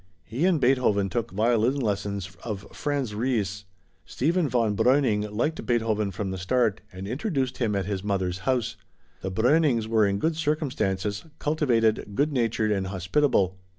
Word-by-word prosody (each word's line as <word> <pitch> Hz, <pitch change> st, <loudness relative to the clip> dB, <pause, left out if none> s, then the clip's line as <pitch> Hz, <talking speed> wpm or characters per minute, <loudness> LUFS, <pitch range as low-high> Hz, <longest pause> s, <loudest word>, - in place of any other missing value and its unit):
He 120 Hz, -, -2 dB
and 175 Hz, -5 st, +3 dB
Beethoven 120 Hz, -7 st, +2 dB
took 115 Hz, +3 st, -1 dB
violin 115 Hz, +4 st, +2 dB
lessons 100 Hz, -4 st, -2 dB
of 105 Hz, -4 st, -5 dB
Franz 140 Hz, -6 st, -2 dB
Ries. 105 Hz, -4 st, -1 dB, 0.4 s
Stephen 160 Hz, +3 st, 0 dB
von 115 Hz, -4 st, +1 dB
Breuning 110 Hz, -4 st, +2 dB
liked 150 Hz, +10 st, -1 dB
Beethoven 110 Hz, -4 st, 0 dB
from 95 Hz, 0 st, -4 dB
the 95 Hz, -, -4 dB
start 110 Hz, +2 st, +1 dB
and 95 Hz, +1 st, -7 dB
introduced 130 Hz, -, -2 dB
him 110 Hz, -5 st, 0 dB
at 100 Hz, -2 st, -1 dB
his 100 Hz, -1 st, -3 dB
mother's 95 Hz, -3 st, -1 dB
house. 125 Hz, -4 st, 0 dB, 0.4 s
The 95 Hz, -, -3 dB
Breunings 120 Hz, -, +2 dB
were 110 Hz, -2 st, +3 dB
in 100 Hz, 0 st, 0 dB
good 160 Hz, +9 st, 0 dB
circumstances, 110 Hz, -, -1 dB
cultivated, 115 Hz, -9 st, +1 dB
good 145 Hz, +4 st, +1 dB
natured 115 Hz, -3 st, +1 dB
and 95 Hz, -2 st, 0 dB
hospitable. 95 Hz, -, +1 dB
110 Hz, 150 wpm, -26 LUFS, 100-130 Hz, 0.4 s, and